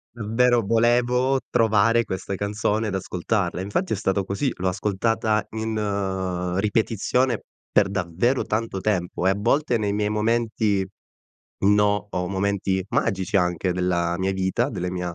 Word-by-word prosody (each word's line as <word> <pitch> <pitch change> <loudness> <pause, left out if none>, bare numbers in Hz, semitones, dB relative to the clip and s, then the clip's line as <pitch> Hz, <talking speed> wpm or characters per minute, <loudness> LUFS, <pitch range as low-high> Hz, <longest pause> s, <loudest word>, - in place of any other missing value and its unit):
Mhmm, 110 -1 -5
vero 120 0 +4
volevo 120 +4 +2
trovare 115 +1 +3
questa 95 0 -4
canzone 105 +2 -1
ed 100 - -3
ascoltarla, 95 0 -1
e - - -2
infatti 175 - -1
è - - -2
stato 95 0 0
così, 100 +9 -1
l'ho 95 +1 -1
ascoltata 105 +3 0
in 95 -5 -2
ripetizione 115 +3 +1 0.3
per 100 - +4
davvero 95 +7 0
tanto 110 -3 -2
tempo, 90 -3 -1
e - - +5
a - - +2
volte 125 +4 +1
nei 105 -2 -1
miei 105 0 0
momenti 105 -2 +1 0.8
no 105 0 +3
o 90 -2 -2
momenti 95 0 0
magici 95 -3 0
anche 90 0 +1
della 90 -1 0
vita, 95 0 0
delle 90 0 -3
mia 90 -1 -4
100 Hz, 145 wpm, -24 LUFS, 95-110 Hz, 0.8 s, e